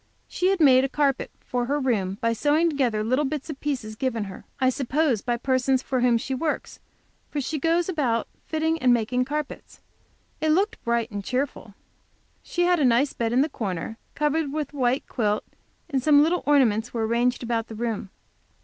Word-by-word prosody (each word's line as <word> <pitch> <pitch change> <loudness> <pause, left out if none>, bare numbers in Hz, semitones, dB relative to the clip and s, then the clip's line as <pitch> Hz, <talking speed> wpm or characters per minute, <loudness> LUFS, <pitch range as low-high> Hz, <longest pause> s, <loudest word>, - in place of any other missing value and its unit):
She 360 - 0
had 385 -1 +2
made 265 -4 +6
a 270 - 0
carpet 280 -1 0
for 245 -1 -2
her 290 +2 0
room 200 -8 0
by 230 0 +2
sewing 300 +7 +2
together 245 -7 0
little 255 +6 +1
bits 295 +2 -3
of 275 - -9
pieces 250 -7 -3
given 230 -2 -1
her, 195 -2 -9
I 260 0 +3
suppose, 270 -2 0
by 240 +1 -1
persons 260 +1 +1
for 260 - -1
whom 240 -1 +4
she 265 +3 -4
works, 300 +4 -3 0.5
for 295 - -3
she 300 +3 -2
goes 335 +3 +1
about 260 - 0 0.2
fitting 320 +1 0
and 255 -4 +4
making 250 +2 0
carpets. 300 +1 -5 0.6
It 310 0 +2
looked 395 +5 0
bright 235 -1 0
and 205 -1 -5
cheerful. 250 -4 -3 0.7
She 350 - -1
had 355 -1 +3
a - - +2
nice 255 +3 +3
bed 230 -1 -1
in 250 +2 +3
the 295 - +2
corner, 215 - -4 0.2
covered 300 0 0
with 300 -1 -3
a - - -9
white 255 +1 +1
quilt, 210 -4 0 0.4
and 275 -5 -1
some 290 +1 +6
little 340 +3 +1
ornaments 245 -6 +3
were 225 -1 0
arranged 240 +3 +1
about 230 -1 -1
the 220 - -8
room. 225 -2 -3
260 Hz, 195 wpm, -25 LUFS, 235-295 Hz, 0.7 s, made